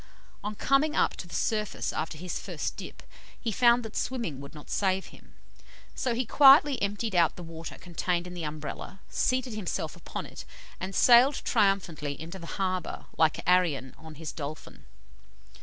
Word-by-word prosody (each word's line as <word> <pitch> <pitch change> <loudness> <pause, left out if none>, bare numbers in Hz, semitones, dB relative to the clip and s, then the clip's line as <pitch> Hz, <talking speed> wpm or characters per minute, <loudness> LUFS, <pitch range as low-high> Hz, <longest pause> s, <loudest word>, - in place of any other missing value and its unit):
On 210 +1 -3
coming 275 +7 +2
up - - +2
to 175 - -7
the 170 - -8
surface 215 -2 -1
after 160 0 -3
his 180 +2 -4
first - - -4
dip, - - -9 0.4
he 230 - -2
found 240 +2 +4
that 220 - -8
swimming 230 - -2
would 140 +2 -11
not 150 - -11
save 190 -1 +1
him; - - -18 0.6
so 245 -3 -1
he 250 +2 0
quietly 280 +2 +7
emptied 205 +2 -1
out 170 -3 +3
the 175 - -8
water 165 0 -8
contained 175 0 -2
in 180 - -8
the 175 - -6
Umbrella, 155 +5 -6
seated 255 -2 0
himself 210 -4 -3
upon - - -6
it, - - -9 0.4
and 190 +1 -5
sailed 250 +4 +6
triumphantly 190 - +1
into 170 +4 -7
the 170 - -9
harbour, 185 -2 -2
like 160 0 +2
Arion 165 -8 +2
on 160 -1 -12
his 155 -1 -6
dolphin. 150 0 -8
185 Hz, 170 wpm, -28 LUFS, 160-230 Hz, 0.6 s, quietly